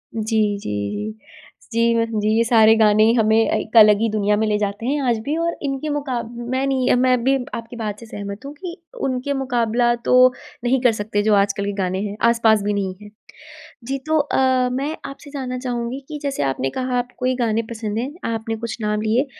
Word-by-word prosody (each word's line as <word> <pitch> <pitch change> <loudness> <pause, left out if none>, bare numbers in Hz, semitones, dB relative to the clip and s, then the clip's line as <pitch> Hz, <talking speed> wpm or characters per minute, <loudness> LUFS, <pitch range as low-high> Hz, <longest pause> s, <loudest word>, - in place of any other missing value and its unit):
जी, 215 -2 0
जी, 105 - -5 0.2
जी। 105 +1 -5 0.6
जी 230 0 +3
मैं 230 0 +2
जी 210 +1 0
ये 230 - +4
सारे 225 -1 +5
गाने 215 -1 +4
हमें 220 0 +3
एक 225 0 0
अलग 210 -1 +8
ही 225 - +2
दुनिया 210 -1 +1
में 220 - +1
ले 210 -1 +1
जाते 205 +2 -3
हैं 285 +2 0
आज 230 - +2
भी 295 +2 -1
और 335 0 -1
इनके 275 +2 -2
मुकाब 255 -6 -3 0.2
मैं 260 +1 0
नहीं, 260 -2 +2
मैं 250 -1 +2
भी 270 +1 +3 0.2
आपकी 230 +1 -7
बात 210 -3 -4
से 230 - -11
सहमत 200 +3 -7
हूँ 285 - -7
कि 345 +2 -7 0.3
उनके 260 +2 -2
मुकाबला 240 -3 +1
तो 250 - +3 0.5
नहीं 250 +1 +2
कर 245 -3 +5
सकते 205 -1 -2
जो 215 -1 +3
आजकल 200 0 +1
के 205 - -1
गाने 190 -1 -2
हैं, 205 +1 -7
आस-पास 225 -2 +3
भी 205 0 0
नहीं 195 -2 -2
है। 210 - -11 0.8
जी 270 +2 -2
तो 315 0 +2
अ, 260 -3 +2
मैं 280 +5 -2
आपसे 275 +1 -10
जानना 255 -3 -4
चाहूँगी 245 0 -3
कि 300 -1 -5
जैसे 280 -1 -2
आपने 135 -1 -1
कहा 255 -1 -1
आपको 245 +1 -4
ये 255 - +2
गाने 230 -2 0
पसंद 220 -1 -4
हैं, 255 +4 -2 0.2
आपने 225 0 -3
कुछ 230 0 -5
नाम 210 0 -1
लिए 235 +6 +1
230 Hz, 210 wpm, -21 LUFS, 210-260 Hz, 0.8 s, अलग